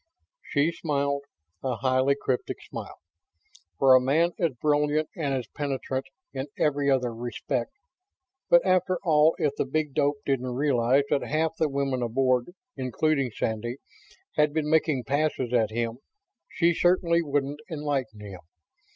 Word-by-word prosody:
She 150 - +1
smiled 140 -3 -1 0.4
a 130 -2 -1
highly 130 +3 +2
cryptic 130 -2 -2
smile. - - -8 0.8
For 135 -1 +6
a 130 - +7
man 155 +7 +2
as 165 -5 +1
brilliant 150 +1 +1
and 140 -5 -1
as 125 -2 -3
penetrant 135 -2 -3 0.3
in 135 +1 -4
every 145 -2 +1
other 125 -3 +1
respect... 120 - -3 0.8
but 175 +1 +6
after 185 0 +2
all, 155 -2 +4
if 145 -2 0
the - - 0
big 150 +1 -2
dope 145 0 +1
didn't 130 -2 -1
realize 135 -1 +3
that 140 - +2
half 160 +1 -1
the 155 - +1
women 135 -2 -1
aboard, 125 +1 +1 0.3
including 135 +1 0
Sandy, 115 +2 -3 0.6
had 150 -1 +3
been 155 -1 0
making 155 -5 +2
passes 135 -2 -1
at 115 -3 +3
him, 115 +1 -3 0.5
she 170 +1 +2
certainly 170 -1 +3
wouldn't 145 -1 -1
enlighten 140 -9 -3
him. 100 -3 -9
140 Hz, 140 wpm, -26 LUFS, 130-155 Hz, 0.8 s, a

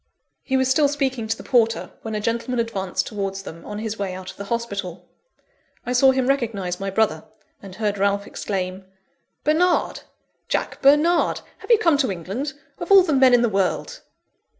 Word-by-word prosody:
He 265 - 0
was 260 0 +2
still 285 +3 +4
speaking 265 -5 -2
to 220 - -1
the - - -10
porter, 230 -3 +1
when 220 -1 -5
a - - -1
gentleman 235 +3 -2
advanced 200 -6 -2
towards 195 -2 -4
them, 165 -3 -10
on 210 - -6
his 220 0 -4
way 190 -2 -3
out 185 0 -7
of - - -20
the 200 - -6
hospital. 200 -6 -4 0.8
I 250 - -2
saw 265 +2 +5
him 260 -1 +2
recognise 220 -10 -1
my 195 0 -3
brother, 195 -6 0 0.4
and 195 -2 -11
heard 205 -1 -2
Ralph 200 0 +1
exclaim: 190 -2 -4 0.6
"Bernard! 340 +4 +2 0.5
Jack - - -2
Bernard! 300 +5 +4 0.2
Have - - -13
you 465 - +7
come 330 -9 +3
to 260 -8 +1
England, 195 - -4 0.3
of - - -5
all 390 -1 +9
the 325 -4 0
men 260 -2 +6
in 240 - +3
the - - +4
world!" 195 -3 -1
225 Hz, 185 wpm, -22 LUFS, 195-265 Hz, 0.8 s, all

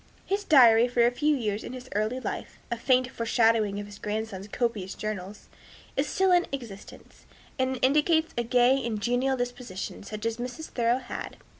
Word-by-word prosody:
His 400 +1 -1
diary 240 - +6
for 240 -1 +3
a 240 - +3
few 295 +4 +1
years 215 -3 -2
of - - -7
his 255 0 -9
early 215 +5 -1
life - - -5
a - - +1
faint 255 +2 +2
foreshadowing 225 -4 +2
of 205 - -5
his 205 0 -12
grandson's 210 -2 -4
copious 210 -4 -2
journals 210 -1 -6 0.5
is 275 +2 0
still 380 0 +2
in 355 0 +4
existence, 235 -8 -9 0.3
and 260 0 0
indicates 310 +4 +3
a 240 - 0
gay 250 +3 +3
and 225 -3 -2
genial 245 +5 +1
disposition, 245 -6 -5
such 215 +2 -7
as 230 0 -1
Mrs. 250 +6 -6
Thoreau 235 0 +1
had. 255 -2 -7
240 Hz, 175 wpm, -27 LUFS, 215-260 Hz, 0.5 s, diary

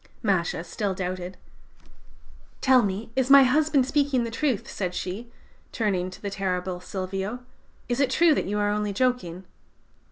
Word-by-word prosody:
"Masha 180 -5 0
still 195 +1 -3
doubted. 185 0 -4 1.2
"'Tell 260 -1 +5
me, 205 +2 -3
is 260 0 +1
my 275 0 +9
husband 285 +1 +3
speaking 280 -2 +1
the 230 - -4
truth?' 255 -2 -1
said 180 -2 -4
she, 210 +8 -5 0.4
turning 190 -5 -1
to 185 - -11
the 200 - -5
terrible 185 -2 -2
Silvio: 190 +5 -4 0.5
'is 245 +1 -1
it 275 -2 +3
true 325 +4 +4
that - - -1
you 205 +1 -1
are 205 0 +1
only 210 -1 -1
joking?' 195 -7 -1
205 Hz, 155 wpm, -25 LUFS, 185-255 Hz, 1.2 s, my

